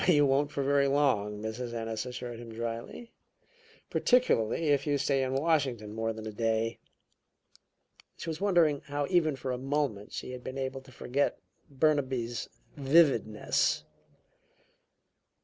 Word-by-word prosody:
"You 145 -5 +6
won't 140 +1 +2
for 140 -1 -2
very 140 0 +3
long," 110 -8 +1
Mrs. 120 +2 -4
Ennis 115 +1 -3
assured 125 -1 -6
him 120 -1 -9
dryly. 115 - -6 0.8
"Particularly 165 - +2
if 145 +1 +2
you 145 -1 +2
stay 135 0 +1
in 130 0 -1
Washington 135 -8 0
more 115 0 -1
than 110 0 -7
a 110 - -4
day." 115 +1 0 1.4
She - - -7
was 160 +2 -4
wondering 170 -8 +3
how 145 0 -1
even 160 -5 +3
for 130 0 -4
a 125 - -3
moment 135 -6 -1
she - - -5
had 125 -1 -8
been 130 +1 -6
able 135 0 -3
to 130 0 -16
forget 135 +3 -1 0.3
Burnaby's 130 -5 0 0.3
vividness. 135 -7 +3
130 Hz, 140 wpm, -30 LUFS, 115-145 Hz, 1.4 s, You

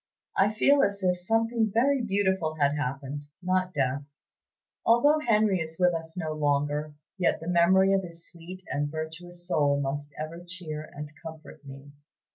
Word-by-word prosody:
I 200 +2 +4
feel 275 +6 +4
as 200 -1 0
if 180 -1 +2
something 225 +3 +1
very 260 +5 +3
beautiful 190 -7 0
had 145 -2 +2
happened, 140 +1 -4 0.2
not 185 0 +1
death. 135 -3 0 0.8
Although 290 +7 +5
Henry 215 -8 +3
is 160 0 -5
with 180 -1 +4
us 165 +1 -5
no 160 -3 -2
longer, 145 0 0 0.2
yet 180 - +2
the 165 - -8
memory 190 +3 +4
of 195 - +3
his 170 -2 -8
sweet 180 +2 -10
and 145 +1 -1
virtuous 170 +3 -7
soul 145 -4 +2
must 145 +1 -3
ever 160 +3 -6
cheer 175 -4 -6
and 150 0 -7
comfort 160 -2 -10
me. 135 +1 -11
170 Hz, 160 wpm, -28 LUFS, 150-190 Hz, 0.8 s, Although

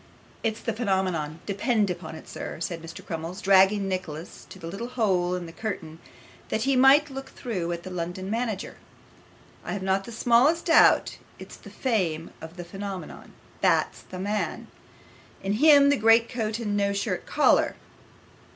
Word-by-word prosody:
'It's 220 -1 -2
the 230 - -2
phenomenon, 190 -8 -1
depend 205 0 +1
upon 170 -2 -7
it, 160 - -12
sir,' - - -7
said 170 0 -4 0.2
Crummles, 165 +3 -5
dragging 195 0 +4
Nicholas 180 -4 -5
to - - -11
the - - -10
little 195 +8 -5
hole 190 -8 +1
in 180 -1 -5
the 165 - -9
curtain 165 -5 -6 0.5
that 220 - -1
he 270 +1 +2
might 275 +3 +6
look 270 0 -7
through 185 -9 -4
at 170 0 -4
the 185 - -8
London 180 +2 -4
manager. 220 -2 -3 0.9
'I - - -4
have 200 - -4
not 190 0 0
the - - -9
smallest 245 +8 +3
doubt 330 - +4 0.2
it's - - -11
the - - -13
fame 180 -11 -1
of 160 +3 -10
the 175 - -6
phenomenon 195 -2 -7 0.3
that's - - +2
the 185 - -10
man; 205 +3 -3 0.7
him 280 +9 +6
in 280 - +5
the 285 - +3
great 225 +1 +5
coat 220 -3 -2
and 210 -3 -2
no 200 0 +1
shirt 200 - -3
collar. - - +3
200 Hz, 165 wpm, -26 LUFS, 180-230 Hz, 0.9 s, might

